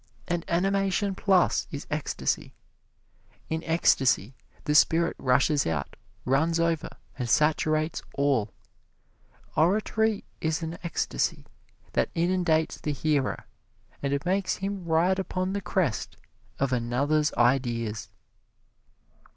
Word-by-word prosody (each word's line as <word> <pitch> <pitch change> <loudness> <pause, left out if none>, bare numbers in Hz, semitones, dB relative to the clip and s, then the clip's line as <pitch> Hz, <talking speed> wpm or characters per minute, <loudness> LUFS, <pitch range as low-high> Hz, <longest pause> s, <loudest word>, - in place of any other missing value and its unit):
And 175 -1 -1
animation 195 +2 +1
plus 190 -1 +2
is 145 -4 -6
ecstasy. 150 0 -2 0.9
In 160 +1 -2
ecstasy 135 - +2 0.3
the 150 - 0
spirit 165 +2 +4
rushes 135 +3 +2
out, 75 -3 -3 0.3
runs 160 +6 +2
over 165 -2 0 0.3
and 120 -2 -2
saturates 155 +3 +2
all. 135 -7 +1 1.0
Oratory 215 +5 +2 0.2
is 160 +1 -1
an 165 +1 -5
ecstasy 165 - -1 0.5
that - - +1
inundates 170 -2 +1
the 150 - -1
hearer 145 -1 0 0.6
and 140 +1 -1
makes 190 +1 +1
him 195 -1 -4
ride 170 +4 +2
upon 185 0 -2
the 200 - -2
crest 175 - -1 0.4
of 135 -1 0
another's 140 +6 +1
ideas. 120 -3 +1
160 Hz, 105 wpm, -27 LUFS, 135-180 Hz, 1.0 s, spirit